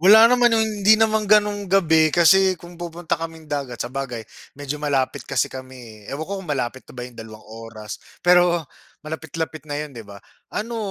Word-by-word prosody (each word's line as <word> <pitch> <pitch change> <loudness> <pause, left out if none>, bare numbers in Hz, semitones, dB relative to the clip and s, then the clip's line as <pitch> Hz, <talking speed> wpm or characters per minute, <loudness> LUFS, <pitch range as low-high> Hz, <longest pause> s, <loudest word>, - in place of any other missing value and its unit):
Wala 210 +6 +8
naman 245 -2 +4
yung 220 - +3 0.2
hindi 205 +2 +7
naman 220 -2 +2
ganung 205 -2 +3
gabi 160 -5 +4
kasi 185 +3 +5
kung 175 +2 -13
pupunta 170 -1 -3
kaming 165 -1 -7
dagat 140 -4 -3
sabagay, 125 -2 -5 0.3
medyo 145 +1 -5
malapit 140 -3 -1
kasi 135 -2 +1
kami, 125 -5 -11
eh. - - -6
Ewan 150 +3 -4
ko 200 - -6
kung 175 - -12
malapit 130 -2 -2
na - - -12
ba 125 - -5
yung 125 - -16
dalawang 110 -1 -10
oras, 110 -1 -9 0.2
pero 175 -1 +4 0.4
malapit-lapit 160 0 -5
na 145 - -3
'yon, 150 -2 -7
di 115 - -8
ba? 100 - -11 0.4
Ano, 230 +2 -3
160 Hz, 185 wpm, -22 LUFS, 130-190 Hz, 0.4 s, Wala